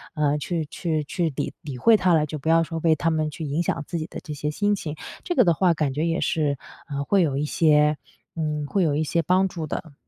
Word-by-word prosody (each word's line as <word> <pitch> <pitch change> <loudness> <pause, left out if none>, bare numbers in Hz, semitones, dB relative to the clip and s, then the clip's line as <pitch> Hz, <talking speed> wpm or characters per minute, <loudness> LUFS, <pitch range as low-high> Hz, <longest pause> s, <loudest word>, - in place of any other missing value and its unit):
啊 150 -1 +2
去 165 +1 -2
去 155 +1 -2
去 165 +2 -1
理 - - -3
理 140 -4 -7
会 220 - +5
它 185 -4 +3
了， 155 -1 +3
就 155 0 -6
不 160 +4 -3
要 165 0 +5
说 165 +1 -4
为 160 -1 +4
它 165 +3 0
们 155 -1 0
去 155 +1 -6
影 145 +4 -1
响 155 - -1
自 170 -2 -3
己 155 - -4
的 - - -8
这 155 -4 -6
些 150 +1 -3
心 205 +6 +1
情， 155 -6 -5 0.3
这 350 - -2
个 - - +6
的 170 - +4
话 175 +1 +2
感 150 -3 0
觉 155 +4 0
也 165 +1 0
是， 150 -5 0 0.3
嗯， 140 0 -2
会 195 +5 +3
有 140 -5 +1
一 150 - 0
些 150 -1 +3 0.4
嗯， 150 -2 -2
会 195 +7 0
有 145 -3 +1
一 155 - +1
些 160 +2 0
帮 185 +4 +2
助 165 -4 -5
的。 155 +1 -5
155 Hz, 280 characters per minute, -24 LUFS, 150-170 Hz, 0.4 s, 个